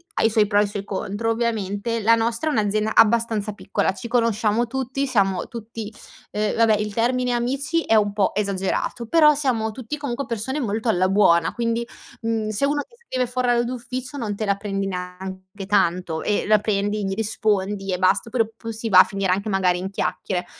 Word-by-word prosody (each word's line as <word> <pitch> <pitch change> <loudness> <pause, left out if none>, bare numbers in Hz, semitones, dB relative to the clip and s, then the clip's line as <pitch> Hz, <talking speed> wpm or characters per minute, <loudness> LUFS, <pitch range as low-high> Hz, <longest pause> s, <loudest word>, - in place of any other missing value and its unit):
ha - - 0
i 225 - +5
suoi 215 -1 +3
pro 205 0 +2
e - - +5
i - - -3
suoi 200 0 -5
contro, 205 +3 -2
ovviamente, 225 -1 -1
la 225 +2 +4
nostra 230 +6 +1
è - - 0
un'azienda 215 0 0
abbastanza 225 -2 +3
piccola. 200 - -1
Ci 235 +5 -7
conosciamo 230 -1 +1
tutti, 265 +2 -2
siamo 195 -6 +1
tutti 225 -1 -7 0.4
uhm, 210 0 0
vabbè 225 -1 +4
il 210 0 -3
termine 250 +3 +1
amici 275 +7 0
è 225 - +2
un 205 -1 +3
po' 200 -2 +1
esagerato, 200 +3 -2
però 305 -1 +6
siamo 245 -7 0
tutti, 255 +5 -6
comunque, 280 -1 -4
persone 240 +6 -3
molto 225 -1 -2
alla 185 -3 +3
buona, 170 -5 +4
quindi, 235 0 -1 0.4
mhmm, 225 -1 -1
se 215 +4 -2
uno 290 +1 0
ti 470 0 -24
scrive 255 -1 0
fuor 250 +1 -2
orario 240 -1 +3
d'ufficio 255 +2 -5
non 215 -6 -3
te 215 - -3
la 200 - +2
prendi 195 -1 -3
neanche 185 +1 -6
tanto, 180 -4 +1
e 210 - 0
la 210 0 +4
prendi 205 0 -1
gli 195 - -1
rispondi, 205 -2 -1
e 180 - 0
bast 190 +4 +2
però 230 -1 +1
p 225 +1 -10
si 225 0 -4
va 185 -3 +7
a - - +10
finire 195 -2 -1
anche 200 +3 -1
magari 185 -2 +2
in 190 +1 -4
chiacchiere. 185 -2 -2
215 Hz, 200 wpm, -22 LUFS, 200-235 Hz, 0.4 s, a